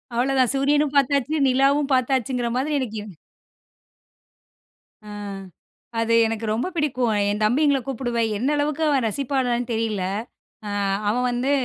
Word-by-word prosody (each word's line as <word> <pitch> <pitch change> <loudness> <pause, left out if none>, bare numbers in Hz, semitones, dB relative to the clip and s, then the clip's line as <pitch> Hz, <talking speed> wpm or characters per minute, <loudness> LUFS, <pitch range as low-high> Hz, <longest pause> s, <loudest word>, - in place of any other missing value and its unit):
அவ்ளோதான் 255 0 +2
சூரியனும் 290 +1 +2
பார்த்தாச்சு, 280 +1 +2
நிலாவும் 275 +2 +2
பார்த்தாச்சுங்கற 255 -1 0
மாதிரி 295 +4 -1
எனக்கு 220 -5 -4
எவ் 210 - -10 2.0
அ - - -9 0.9
அது 230 0 +1
எனக்கு 225 0 -3
ரொம்ப 235 +8 -1
பிடிக்கும். 255 -7 0
அ - - +1
என் 210 +1 -3
தம்பிங்கள 280 +4 +3
கூப்புடுவேன், 235 -3 -1
என்னளவுக்கு 290 +5 0
அவன் 275 -5 +2
ரசிப்பானான்னு 245 0 -1
தெரியல. 220 -4 -1 0.6
அ - - -4 0.4
அவன் 250 +4 0
வந்து 245 +3 -1
255 Hz, 125 wpm, -23 LUFS, 235-280 Hz, 2.0 s, தம்பிங்கள